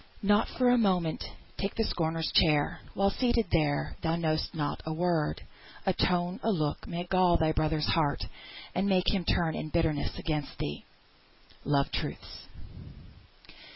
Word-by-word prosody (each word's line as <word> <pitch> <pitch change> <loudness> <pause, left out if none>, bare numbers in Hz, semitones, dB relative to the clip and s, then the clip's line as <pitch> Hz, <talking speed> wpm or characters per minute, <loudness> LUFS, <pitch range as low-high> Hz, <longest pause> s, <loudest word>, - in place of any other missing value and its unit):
"Not 205 +1 +4
for 250 -1 +4
a 245 - +4
moment 180 -7 +1 0.4
take 195 0 -2
the 225 - +1
scorner's 165 -5 -1
chair; 150 -4 +3 0.2
While 195 0 +3
seated 240 -2 +1
there, 150 -3 +1
thou 165 0 +1
know'st 160 -2 -1
not 145 -2 -2
how 160 - -3
a - - -5
word, 170 -3 0 0.4
A 190 - +3
tone, 180 +2 0
a - - 0
look, 155 -8 -1
may 170 +1 -3
gall 180 -1 +3
thy 160 -1 +2
brother's 155 -1 0
heart, 145 -5 +1 0.5
And 195 +2 0
make 185 0 +3
him 190 -4 -1
turn 165 -1 +1
in 155 - -4
bitterness 160 -2 0
against 150 -3 -3
thee." 75 - -4 0.8
"LOVE 140 -1 +2
TRUTHS." - - -5
170 Hz, 155 wpm, -29 LUFS, 155-190 Hz, 0.8 s, Not